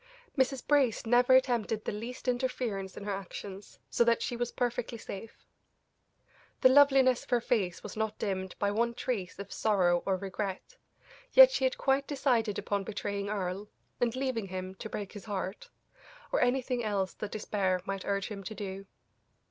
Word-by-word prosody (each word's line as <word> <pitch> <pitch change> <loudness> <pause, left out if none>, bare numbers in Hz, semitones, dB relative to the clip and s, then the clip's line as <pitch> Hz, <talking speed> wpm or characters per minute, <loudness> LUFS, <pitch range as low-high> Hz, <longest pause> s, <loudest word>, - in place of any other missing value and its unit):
Mrs. 265 -2 +1
Brace 270 -6 +3
never 245 +2 +5
attempted 235 -4 +2
the - - -1
least 235 +5 -7
interference 245 -6 -2
in - - -6
her 205 - -3
actions, 195 +1 -8
so - - +4
that 235 -1 +2
she 240 - -2
was 240 0 -2
perfectly 245 -1 -2
safe. 220 0 -9 1.2
The 255 - +8
loveliness 270 -2 +6
of - - -20
her 245 - +3
face 215 -7 -1
was 210 - -7
not 220 -1 -2
dimmed 190 -2 -3
by 200 0 +1
one 235 +3 0
trace 205 -10 -3
of 200 0 -7
sorrow 180 -5 +2
or 190 -1 +2
regret, 195 - -5 0.6
yet - - +10
she 265 - +1
had 260 - 0
quite 275 +1 +1
decided 245 -7 +1
upon 200 -1 -1
betraying 200 0 -3
Earle, 200 0 -3 0.3
and 240 -1 +1
leaving 255 -6 -1
him 185 0 -5
to 220 - -5
break 205 -2 -5
his 205 - -10
heart, 195 -1 -4 0.6
or - - +2
anything 250 -1 +1
else 200 -3 -1
that 210 - -5
despair 195 -3 0
might 195 -1 -3
urge 200 -1 -1
him 200 -2 -6
to 215 - -5
do. 195 -1 -6
215 Hz, 170 wpm, -30 LUFS, 195-250 Hz, 1.2 s, yet